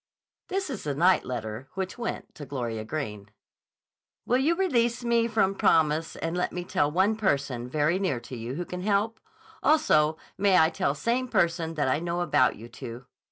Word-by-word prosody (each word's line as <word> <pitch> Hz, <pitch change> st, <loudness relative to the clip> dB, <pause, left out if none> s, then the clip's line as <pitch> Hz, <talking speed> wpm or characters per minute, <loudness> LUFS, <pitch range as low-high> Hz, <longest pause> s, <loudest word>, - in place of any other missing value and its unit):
This 385 Hz, -4 st, -2 dB
is -, -, -5 dB
the 145 Hz, -2 st, -1 dB
night 180 Hz, +5 st, +4 dB
letter 120 Hz, 0 st, -5 dB
which 190 Hz, -1 st, -3 dB
went 235 Hz, -, -4 dB
to 150 Hz, -, -9 dB
Gloria 120 Hz, -5 st, -3 dB
Greene. 105 Hz, -6 st, -5 dB, 1.0 s
Will 250 Hz, +2 st, +2 dB
you 310 Hz, +6 st, +2 dB
release 245 Hz, -10 st, +1 dB
me 235 Hz, -1 st, +2 dB
from 210 Hz, -4 st, +2 dB
promise 160 Hz, -3 st, +2 dB
and 165 Hz, +1 st, -3 dB
let 180 Hz, -, 0 dB
me 180 Hz, -, -4 dB
tell 180 Hz, -5 st, +1 dB
one 190 Hz, +7 st, +2 dB
person, 140 Hz, -, -1 dB
very 155 Hz, +6 st, +1 dB
near 180 Hz, -11 st, 0 dB
to 125 Hz, -, -8 dB
you, 120 Hz, +2 st, -5 dB
who 175 Hz, +3 st, -3 dB
can 180 Hz, +1 st, -6 dB
help? 210 Hz, +3 st, 0 dB, 0.4 s
Also, 155 Hz, -, +3 dB, 0.2 s
may 195 Hz, -2 st, +4 dB
I 160 Hz, 0 st, +5 dB
tell 185 Hz, -2 st, 0 dB
same 250 Hz, +2 st, 0 dB
person 165 Hz, -6 st, 0 dB
that 145 Hz, -3 st, 0 dB
I 130 Hz, +3 st, +2 dB
know 175 Hz, +1 st, -2 dB
about 130 Hz, -8 st, +3 dB
you 115 Hz, -, -10 dB
two? 120 Hz, +1 st, -9 dB
170 Hz, 185 wpm, -27 LUFS, 135-205 Hz, 1.0 s, I